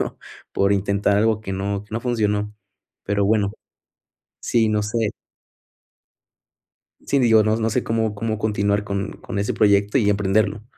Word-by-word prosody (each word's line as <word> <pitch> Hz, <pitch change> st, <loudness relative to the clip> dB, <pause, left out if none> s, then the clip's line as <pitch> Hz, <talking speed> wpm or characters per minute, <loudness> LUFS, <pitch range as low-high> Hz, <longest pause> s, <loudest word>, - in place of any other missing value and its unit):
¿no? -, -, -4 dB, 0.3 s
Por 100 Hz, +1 st, +2 dB
intentar 100 Hz, +1 st, +1 dB
algo 110 Hz, 0 st, +2 dB
que 95 Hz, -3 st, -6 dB
no, 100 Hz, +1 st, -3 dB
que -, -, -26 dB
no 115 Hz, -, -1 dB
funcionó, 105 Hz, -4 st, -1 dB, 0.5 s
pero 100 Hz, 0 st, 0 dB
bueno. 105 Hz, -1 st, +1 dB, 0.9 s
Sí, 115 Hz, -2 st, +2 dB
no 105 Hz, -1 st, +1 dB
sé. 110 Hz, 0 st, -1 dB, 1.9 s
Sí, 140 Hz, -, 0 dB
digo, 110 Hz, -4 st, +5 dB
no 110 Hz, +1 st, +2 dB
no 115 Hz, 0 st, 0 dB
sé -, -, 0 dB
cómo 110 Hz, -1 st, -1 dB
cómo 110 Hz, 0 st, -2 dB
continuar 105 Hz, -1 st, 0 dB
con 100 Hz, -1 st, -3 dB
con 100 Hz, -, -7 dB
ese 100 Hz, -, -1 dB
proyecto 100 Hz, +2 st, +3 dB
y 105 Hz, -5 st, +2 dB
emprenderlo. 105 Hz, +1 st, +1 dB
105 Hz, 155 wpm, -22 LUFS, 100-110 Hz, 1.9 s, digo